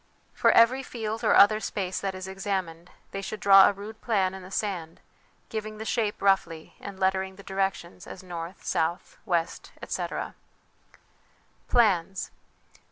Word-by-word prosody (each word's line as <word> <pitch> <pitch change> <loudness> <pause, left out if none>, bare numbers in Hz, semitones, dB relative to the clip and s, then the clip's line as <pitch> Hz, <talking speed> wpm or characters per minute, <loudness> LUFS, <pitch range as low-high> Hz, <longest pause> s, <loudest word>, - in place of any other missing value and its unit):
For - - +3
every 245 +3 +5
field 225 -3 -5
or 215 - +4
other 215 +2 +7
space 190 -3 -3
that 195 -1 -3
is 185 0 -6
examined, 190 -3 -4 0.2
they 195 - -4
should 210 +2 -6
draw 195 -1 +8
a - - +3
rude 205 +2 -10
plan 195 -5 +1
in 190 - -8
the 185 - -11
sand, 185 -5 -3 0.5
giving 215 -1 -5
the 220 - -6
shape 220 -3 -1
roughly 175 -5 +1
and 200 -1 -9
lettering 190 0 0
the 200 - -13
directions 190 -3 -3
as 190 - -9
N, 180 - -14
S, 170 +2 -5
W, 170 +1 -1 0.3
etc. - - -4 1.3
Plans. 195 -5 +2
195 Hz, 150 wpm, -27 LUFS, 185-210 Hz, 1.3 s, draw